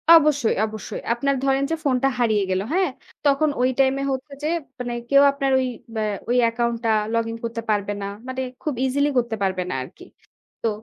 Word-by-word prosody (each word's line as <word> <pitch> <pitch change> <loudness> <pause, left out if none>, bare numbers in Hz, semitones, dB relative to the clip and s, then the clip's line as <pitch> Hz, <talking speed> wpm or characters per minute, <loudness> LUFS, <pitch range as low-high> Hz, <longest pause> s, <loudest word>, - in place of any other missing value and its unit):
অবশ্যই, 290 -7 +4
অবশ্যই। 215 -1 -6
আপনার 275 +3 0
ধরেন 270 0 +2
যে - - +2
ফোনটা 270 -1 +2
হারিয়ে 215 -4 +3
গেল, 185 +1 +1
হ্যাঁ? 370 -4 +2 0.4
তখন 290 +2 +3
ওই 255 - +4
time 270 0 +4
এ - - -1
হচ্ছে 270 +2 -4
যে, 305 - +1 0.3
মানে 245 -1 -3 0.2
কেউ 280 0 +7
আপনার 275 -1 -1
ওই, 260 - 0 0.3
আ - - 0 0.3
ওই 245 - +3
account 235 0 -1
টা 225 - +3 0.2
login 230 0 -1
করতে 230 0 -3
পারবে 205 -1 +1
না। 200 - -3 0.2
মানে 260 0 -3 0.2
খুব 300 - -1
easily 285 +3 +2
করতে 235 -2 +1
পারবে 185 -1 0
না - - -2
আরকি। - - -13 0.6
তো, 230 - +3
255 Hz, 195 wpm, -23 LUFS, 230-275 Hz, 0.6 s, কেউ